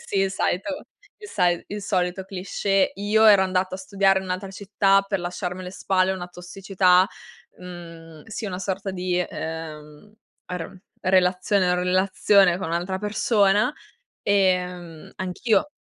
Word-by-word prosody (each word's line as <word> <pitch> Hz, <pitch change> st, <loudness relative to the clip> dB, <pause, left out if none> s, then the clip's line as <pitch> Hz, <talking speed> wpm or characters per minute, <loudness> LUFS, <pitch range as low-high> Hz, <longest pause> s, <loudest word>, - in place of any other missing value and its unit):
sì, 195 Hz, -, -1 dB
il 195 Hz, 0 st, +1 dB
solito 280 Hz, +12 st, -2 dB, 0.3 s
il 415 Hz, -1 st, -11 dB
sai 175 Hz, -2 st, +1 dB
il 205 Hz, 0 st, -5 dB
solito 185 Hz, -1 st, -1 dB
cliché. 195 Hz, +1 st, 0 dB
Io 210 Hz, +2 st, +2 dB
ero 200 Hz, -2 st, +7 dB
andata 185 Hz, 0 st, -1 dB
a -, -, -13 dB
studiare 195 Hz, 0 st, +2 dB
in -, -, -8 dB
un'altra 185 Hz, +2 st, -4 dB
città 195 Hz, 0 st, +2 dB
per 195 Hz, -2 st, -2 dB
lasciarmi 180 Hz, +1 st, -4 dB
alle 180 Hz, 0 st, -7 dB
spalle 190 Hz, -1 st, +1 dB
una 180 Hz, -1 st, -6 dB
tossicità 180 Hz, +1 st, +2 dB, 0.5 s
mhmm, 165 Hz, -3 st, -11 dB
sì, 220 Hz, -1 st, -5 dB
una 180 Hz, -2 st, -4 dB
sorta 195 Hz, +1 st, -3 dB
di, 180 Hz, -1 st, -1 dB
ehm, 160 Hz, +2 st, -7 dB, 0.3 s
aron 180 Hz, +1 st, -7 dB, 0.2 s
relazione 185 Hz, 0 st, +2 dB
o -, -, +2 dB
relazione 185 Hz, 0 st, +3 dB
con 185 Hz, -, -4 dB
un'altra 175 Hz, +3 st, -2 dB
persona. 210 Hz, +1 st, +2 dB, 0.5 s
Ehm, 180 Hz, -4 st, 0 dB
anch'io 195 Hz, +7 st, 0 dB
185 Hz, 140 wpm, -24 LUFS, 180-195 Hz, 0.5 s, ero